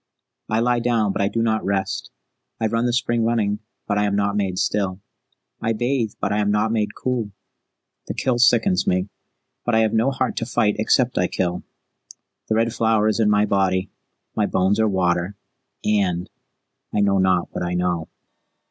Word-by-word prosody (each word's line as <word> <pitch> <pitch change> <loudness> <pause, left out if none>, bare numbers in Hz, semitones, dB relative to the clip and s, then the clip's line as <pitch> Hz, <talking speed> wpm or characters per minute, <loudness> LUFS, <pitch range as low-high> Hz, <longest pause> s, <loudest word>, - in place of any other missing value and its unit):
I 110 +1 +1
lie 120 0 +2
down, 115 -4 +1
but - - -1
I 100 - +2
do 115 +2 -1
not 110 -1 +1
rest. 95 -1 -2 0.5
I 110 - 0
run 115 +2 +1
the - - +1
spring 120 -1 +1
running, 110 -3 +1 0.3
but 105 -1 0
I 105 - +2
am 100 -1 0
not 100 0 0
made 95 -3 -1
still. 95 -1 0 0.6
I 115 - +1
bathe, 120 -1 -1
but 100 - -1
I 105 - +1
am 105 -1 +1
not 105 +2 +1
made 105 -2 -1
cool. 125 -5 -2 0.8
The - - -4
kill 125 -2 0
sickens 115 -7 +3
me, 90 +2 +1 0.5
but 120 - +1
I 110 - +4
have 110 -1 +1
no 115 +4 +3
heart 130 -1 -2
to 115 - -1
fight 105 -4 +1
except 125 +2 +2
I 90 - +2
kill. 90 -1 -2 0.9
The 110 - +2
Red 115 +1 +1
Flower 110 -2 +2
is 110 - -1
in 110 -2 +3
my 105 0 +3
body, 95 -2 +1 0.4
my - - +1
bones 95 +3 +1
are 110 -1 +3
water 90 0 0 0.5
and 95 -4 +1 0.6
I 105 - +1
know 100 -1 +3
not 95 -2 +2
what - - -4
I 90 0 -2
know." 90 -2 -1
105 Hz, 190 wpm, -22 LUFS, 95-115 Hz, 0.9 s, I